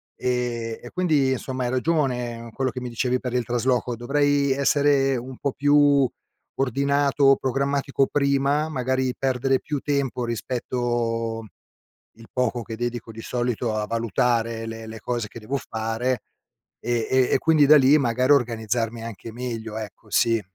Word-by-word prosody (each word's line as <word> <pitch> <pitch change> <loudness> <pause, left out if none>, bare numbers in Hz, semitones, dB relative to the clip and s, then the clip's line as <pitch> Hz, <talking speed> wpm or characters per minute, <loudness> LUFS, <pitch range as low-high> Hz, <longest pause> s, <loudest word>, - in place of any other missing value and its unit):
e 120 -2 -2
e 120 - -8
quindi 155 -7 +2
insomma 130 0 -3
hai 120 - -1
ragione, 125 -5 -1
quello 130 -2 -1
che 125 - -5
mi 125 - -4
dicevi 125 +2 0
per 125 -2 -4
il 125 -1 +1
trasloco, 125 +1 0
dovrei 145 +3 +2
essere 140 -1 +2
un 130 +2 -7
po' 140 - -1
più 145 -2 +4 0.5
ordinato, 140 +1 +3
programmatico 140 +1 0
prima, 140 +1 +2
magari 130 -2 -1
perdere 135 0 +1
più 150 -2 -3
tempo 135 -3 -1
rispetto 115 -1 -2 0.7
il 115 - -13
poco 125 -1 0
che 115 -1 -7
dedico 120 -1 -4
di 115 +1 -9
solito 120 -2 -1
a 105 0 -1
valutare 115 0 0
le 115 0 -7
le 110 0 -8
cose 120 -2 -3
che 115 - -10
devo 130 +6 -3
fare 115 +1 -2 0.6
e 120 -1 -1
e 130 -1 +3
e - - +5
quindi 155 -2 +4
da 155 - +8
lì 140 +2 +6
magari 125 0 +1
organizzarmi 115 -2 0
anche 115 0 -8
meglio, 115 -3 -5
ecco, 105 0 -8
sì. 115 +1 +2
125 Hz, 150 wpm, -24 LUFS, 115-135 Hz, 0.7 s, da